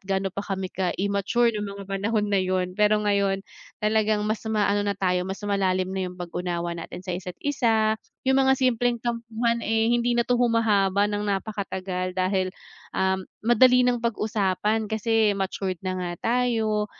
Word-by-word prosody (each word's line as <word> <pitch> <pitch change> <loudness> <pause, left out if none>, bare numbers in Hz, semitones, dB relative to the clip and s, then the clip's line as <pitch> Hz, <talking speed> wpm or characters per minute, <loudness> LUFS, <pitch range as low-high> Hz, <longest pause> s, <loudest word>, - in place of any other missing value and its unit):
gaano 195 -1 -1
pa 200 - -3
kami 190 -2 -4
ka-immature 200 +5 +1
nung 210 -1 -3
mga 200 - -8
panahon 205 +3 -1
na 195 - +4
yun. 185 -1 -1
Pero 210 +2 +2
ngayon 200 -1 +1 0.4
talagang 215 -1 +2
mas 215 +1 -1
maano 205 -1 +2
na 205 -1 -1
tayo 180 -1 0
mas 195 +2 -6
malalim 190 -2 0
na 190 -1 -2
yung 180 - -11
pag-unawa 175 -1 -3
natin 170 +1 -7
sa 180 - -3
isa't 180 0 -6
isa, 225 -6 +2 0.3
yung 265 0 +3
mga 265 0 +4
simpleng 245 -2 +1
tampuhan, 235 0 -1
eh, 225 0 +1
hindi 240 0 +2
na 240 - +3
'to 245 +1 +1
humahaba 210 -4 +2
ng 205 0 -2
napakatagal 190 -2 -3
dahil, 185 0 0 0.4
ah, 190 0 +1 0.2
madali 250 +2 +5
ng 245 -1 +2
pag-usapan 215 -2 0
kasi 220 -1 +2
matured 190 -2 -3
na 185 -1 -2
nga 180 -1 -3
tayo, 225 -3 +1
205 Hz, 160 wpm, -25 LUFS, 190-225 Hz, 0.4 s, madali